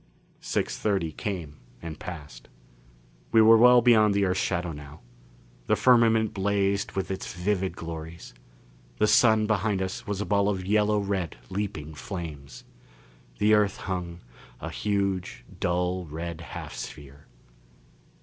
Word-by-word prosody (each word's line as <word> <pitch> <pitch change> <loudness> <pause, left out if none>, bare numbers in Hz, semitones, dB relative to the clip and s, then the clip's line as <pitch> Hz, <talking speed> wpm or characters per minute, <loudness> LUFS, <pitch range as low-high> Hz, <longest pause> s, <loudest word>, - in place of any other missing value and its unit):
Six - - -2
thirty 95 -6 0
came 80 -5 -5 0.2
and 80 +1 -8
passed. 75 -9 -9 0.8
We 115 - +5
were 115 +1 +8
well 125 +1 +7
beyond 110 -4 +5
the 100 -1 +3
Earth's 95 0 0
shadow 90 -2 -1
now. 75 +1 -10 0.7
The - - +3
firmament 115 -3 +4
blazed 100 0 0
with 95 0 -3
its 95 - -5
vivid 95 +1 -1
glories; 80 -2 -8 0.6
the 105 - +3
Sun 110 0 +5
behind 105 -2 0
us 95 0 -4
was 100 -1 -2
a 105 - -2
ball 100 +2 +2
of 95 -3 -2
yellow 105 +1 +2
red 100 -7 -2
leaping 95 -6 -4
flames. 75 -5 -7 0.7
The 105 +1 +3
Earth 105 -2 +3
hung, 90 -2 -5 0.4
a - - -6
huge, 100 - -2
dull 90 +1 0
red 85 +2 -6
half 85 - -8
sphere. 70 0 -9
95 Hz, 135 wpm, -27 LUFS, 85-105 Hz, 0.8 s, were